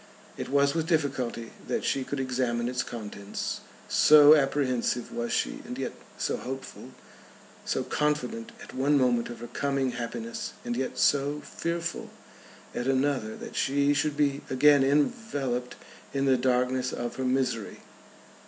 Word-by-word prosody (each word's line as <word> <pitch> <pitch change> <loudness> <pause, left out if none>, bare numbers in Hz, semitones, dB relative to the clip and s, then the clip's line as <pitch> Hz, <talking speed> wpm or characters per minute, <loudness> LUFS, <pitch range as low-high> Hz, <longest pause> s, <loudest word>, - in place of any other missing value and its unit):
It - - -5
was 140 0 +3
with 165 -1 -1
difficulty 135 -8 -1 0.2
that - - -1
she 135 - 0
could 145 +1 -4
examine 125 -2 0
its 125 0 -1
contents, 105 -3 -5 0.3
so 150 0 +8
apprehensive 135 -4 +1
was 120 0 -3
she - - -1
and - - -7
yet - - -2 0.3
so - - -1
hopeful, 135 +1 -7 0.8
so - - 0
confident 150 -6 -1
at - - -11
one 140 +3 +2
moment 125 -3 +2
of 120 -1 -8
her 120 - -6
coming 135 +1 -1
happiness, 225 - -5
and 240 0 -2
yet 130 - -3
so 145 +1 +2
fearful 170 0 -4 0.6
at 120 - -3
another 130 -4 +1
that - - -9
she 140 +1 +2
should 145 0 0
be 140 -2 +1
again 140 +1 +5
enveloped 140 - 0 0.4
in 135 0 +1
the 135 -1 +5
darkness 125 0 +1
of 120 0 -4
her 130 - -2
misery. 125 -4 -1
135 Hz, 145 wpm, -28 LUFS, 125-145 Hz, 0.8 s, so